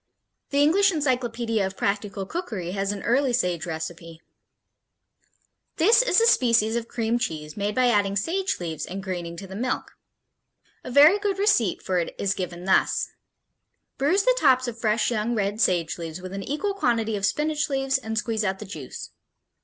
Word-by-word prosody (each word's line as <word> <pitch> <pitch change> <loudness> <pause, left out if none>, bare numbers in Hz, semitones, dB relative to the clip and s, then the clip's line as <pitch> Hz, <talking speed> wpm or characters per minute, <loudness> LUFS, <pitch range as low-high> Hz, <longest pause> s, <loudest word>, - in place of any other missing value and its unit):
The 285 0 +3
English 390 +6 +4
Encyclopedia 245 - -1
of 190 0 -4
Practical 200 -1 -2
Cookery 210 - -5
has 195 +1 -1
an 205 -1 -6
early 255 +2 +2
Sage 180 -8 0
recipe: 165 0 -6 1.6
This 435 +9 +5
is - - +3
a 455 - +4
species 230 - +3
of 235 -1 -2
cream 230 0 -1
cheese 150 -8 -4
made 205 +1 -2
by 255 - +3
adding 205 -4 +2
sage 375 - -1
leaves 160 -4 -4
and 190 +2 -6
greening 175 -3 -5
to 195 - -7
the 190 0 -9
milk. 250 +5 -3 0.9
A - - -7
very 295 +10 +6
good 405 -2 -1
receipt 390 - +2
for 185 -1 0
it 170 - -4
is 200 -1 0
given 180 -1 -6
thus: 190 - +2 0.9
Bruise 350 +9 +2
the - - +3
tops 255 -2 +4
of 240 - -4
fresh 220 +2 +1
young 235 +1 -1
red 205 +1 -1
sage 175 -4 +1
leaves 165 0 -6
with 185 +1 -8
an 195 - -4
equal 305 - -2
quantity 230 - 0
of 200 - -5
spinach 300 +9 0
leaves 270 -1 0
and 220 -3 -5
squeeze 220 0 -1
out 190 -1 -1
the 210 - -8
juice. 155 -9 -8
220 Hz, 175 wpm, -25 LUFS, 190-270 Hz, 1.6 s, very